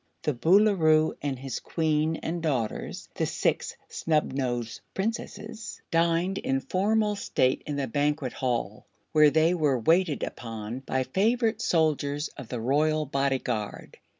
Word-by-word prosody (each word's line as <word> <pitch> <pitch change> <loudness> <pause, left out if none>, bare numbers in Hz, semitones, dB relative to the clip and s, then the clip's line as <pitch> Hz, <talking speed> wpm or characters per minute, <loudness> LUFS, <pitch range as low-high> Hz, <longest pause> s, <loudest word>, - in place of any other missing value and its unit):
The 150 - +1
Boolooroo 160 - +4
and 140 -2 -2
his 135 +1 -5
Queen 155 -1 0
and 170 +1 -2
daughters 130 -9 -2
the - - -1
Six - - -1
Snubnosed 130 -7 -1 0.2
Princesses 215 0 -4
dined 170 +3 +2
in 135 0 0
formal 210 +6 +1
state 130 -9 +1
in 145 - -2
the 140 -1 -1
Banquet 145 +1 0
Hall, 115 -6 -2 0.2
where 155 -1 +6
they 160 +4 +3
were 150 -6 +2
waited 160 +4 +2
upon 115 +1 -5
by 130 0 -1
favorite 220 - +1
soldiers 150 -2 +1
of 135 - -10
the 125 - -4
Royal 150 +5 +2
Bodyguard. 130 -6 -2
150 Hz, 130 wpm, -27 LUFS, 130-170 Hz, 0.2 s, where